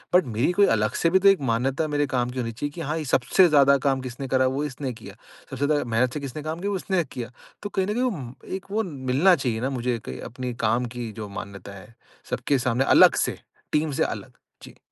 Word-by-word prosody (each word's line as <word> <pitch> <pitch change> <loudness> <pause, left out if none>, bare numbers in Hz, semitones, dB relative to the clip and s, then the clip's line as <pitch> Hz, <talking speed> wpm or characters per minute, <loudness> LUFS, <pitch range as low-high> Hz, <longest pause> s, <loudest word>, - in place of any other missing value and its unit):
But 180 - +5
मेरी 120 +10 +2
कोई 200 +2 +5
अलग 105 0 0
से 165 - +4
भी 190 +3 +4
तो 200 +1 +6
एक 195 -5 +3
मान्यता 135 +7 0
मेरे 145 -1 0
काम 125 -2 0
की 130 - -5
होनी 115 -2 -2
चाहिए 145 +6 -4
कि 165 +3 -8
हाँ, 155 +1 -2
ये 155 - -4
सबसे 135 +8 +4
ज़्यादा 140 -2 +5
काम 135 -1 +2
किसने 130 +1 -6
करा, 130 -1 +3
वो 135 +3 -1
इसने 135 -2 -4
किया। 100 -3 -12 0.3
सबसे 135 +1 -2
ज़्यादा 145 0 +1
मेहनत 120 +3 +1
से 150 - -3
किसने 140 +2 -6
काम 160 +2 -4
किया, 200 +1 -1
वो 195 - 0
इसने 185 -1 0
किया। 125 -2 -7 0.3
तो 205 - -3
कहीं 190 -1 -1
न 210 - -1
कहीं 250 +2 +1
अम, 130 - -7
एक 190 0 -6
वो 220 +2 +1
मिलना 145 +2 +2
चाहिए 120 -7 -2
ना 130 - 0
मुझे 125 -2 -1
क 65 - -6
अपने 125 +1 -5
काम 115 +3 +2
की 120 -2 -4
जो 105 -2 -6
मान्यता 100 0 -8
है, 95 +5 -15 0.4
सबके 140 - +1
सामने 125 +1 +1
अलग - - +7
से। - - -1 0.4
टीम 150 0 +1
से 135 - +1
अलग। - - -4 0.3
जी। - - -13
135 Hz, 245 wpm, -24 LUFS, 120-155 Hz, 0.4 s, अलग